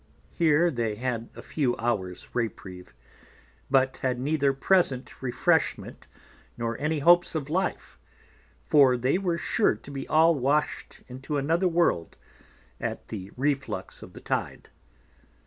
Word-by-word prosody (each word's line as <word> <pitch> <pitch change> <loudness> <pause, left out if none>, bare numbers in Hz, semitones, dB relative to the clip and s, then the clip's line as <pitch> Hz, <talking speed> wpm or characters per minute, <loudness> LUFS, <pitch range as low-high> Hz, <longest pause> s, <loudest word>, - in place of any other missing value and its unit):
Here 165 +1 +3
they 115 -5 -2
had 120 0 -3
a - - -10
few 135 -6 -1
Hours 100 -6 -3
Reprieve, 95 - -5 0.7
but 135 -1 +2
had 125 -2 -1
neither 140 +1 +1
present 135 -2 0
Refreshment, 125 -2 0 0.5
nor 115 0 -2
any 155 +2 0
hopes 175 +4 +4
of 150 -1 -3
Life, 185 +3 -2 0.7
for 135 -4 +5
they 130 +9 +1
were 175 -3 -1
sure 155 - +1
to 125 +6 -13
be 135 -1 -6
all 165 +2 +5
wash'd 145 +1 -1
into 135 +4 -5
another 165 +6 +1
World 165 - 0 0.6
at - - -5
the 100 -3 -6
Reflux 140 +1 -2
of - - -12
the - - -11
Tide. - - -3
135 Hz, 130 wpm, -26 LUFS, 120-155 Hz, 0.7 s, for